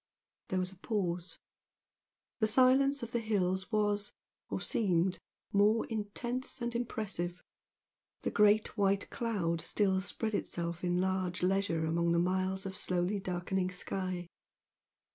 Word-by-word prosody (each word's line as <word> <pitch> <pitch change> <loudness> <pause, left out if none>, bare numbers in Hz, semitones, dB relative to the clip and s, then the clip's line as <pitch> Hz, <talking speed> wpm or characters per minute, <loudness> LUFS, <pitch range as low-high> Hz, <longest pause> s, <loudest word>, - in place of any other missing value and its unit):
There 185 - -1
was 185 0 -1
a 190 - -15
pause. 180 -4 -2 1.0
The 220 - +3
silence 265 +3 +4
of 230 - -5
the 235 - +1
hills 190 -3 0
was, 205 -1 +1 0.4
or - - -2
seemed 185 -4 +1 0.3
more 210 +3 +4
intense 240 +5 -3
and 235 -1 -2
impressive 205 -7 -3 0.8
the - - 0
great 210 +1 +4
white 200 -2 +1
cloud 180 -8 -1
still 190 -2 +1
spread 220 +3 -1
itself 170 -3 -2
in 175 0 +1
large 185 -1 0
leisure 185 -3 +1
along 170 +1 +1
the - - +3
miles 185 +2 +1
of 190 -1 -4
slowly 185 +3 0
darkening 185 0 -1
sky. 185 -1 -3
190 Hz, 130 wpm, -33 LUFS, 180-215 Hz, 1.0 s, silence